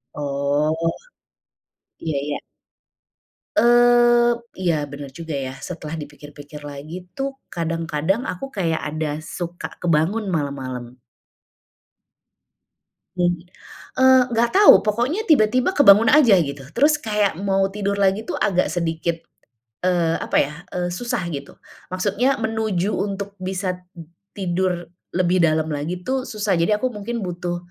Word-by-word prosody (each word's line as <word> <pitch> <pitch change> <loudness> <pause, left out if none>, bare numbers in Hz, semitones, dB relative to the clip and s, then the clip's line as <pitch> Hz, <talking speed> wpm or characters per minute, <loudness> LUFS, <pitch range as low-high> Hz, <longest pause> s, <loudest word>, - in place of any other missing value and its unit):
Oh. 145 +3 0 1.1
Iya 155 -3 -2
iya. 145 - -2 1.2
Eee, 240 0 +5 0.3
iya 170 -3 +2
bener 140 -1 -7
juga 165 0 -6
ya. 130 - -6
Setelah 165 -2 -6
dipikir-pikir 145 0 -12
lagi 145 +5 -7 0.2
tuh 275 0 -2 0.2
kadang-kadang 165 - -1
aku 180 +9 -4
kayak 165 -4 0
ada 155 -1 -2
suka 175 +1 -6
kebangun 175 +6 +1
malam-malam. 130 -6 -4 2.2
Mhm, 175 -1 +1 0.6
eee, 260 0 +7
enggak 235 +1 +2
tahu, 410 - +9
pokoknya 245 - 0
tiba-tiba 255 - +4
kebangun 225 - +7
aja 260 -9 +6
gitu. 140 -2 -5
Terus 295 +4 +4
kayak 210 -5 +1
mau 195 -1 +1
tidur 200 0 -1
lagi 200 +2 +1
tuh - - -2
agak 185 -3 +2
sedikit, 165 -1 -1 0.7
eee, 175 -3 +2
apa - - 0
ya, 145 +2 -2 0.2
eee, 175 0 -1
susah 240 +3 -2
gitu. 140 -3 -6 0.4
Maksudnya 205 +8 +1
menuju 220 -3 -1
untuk 200 0 -3
bisa 185 -1 -2 0.6
tidur 180 -2 -1 0.3
lebih 180 0 +2
dalam 155 0 +1
lagi 150 +5 -3
tuh 260 0 -1
susah. 210 -4 -1
Jadi 170 +5 +1
aku 255 - 0
mungkin 230 +3 -4
butuh 175 0 -3
180 Hz, 120 wpm, -22 LUFS, 160-220 Hz, 2.2 s, tahu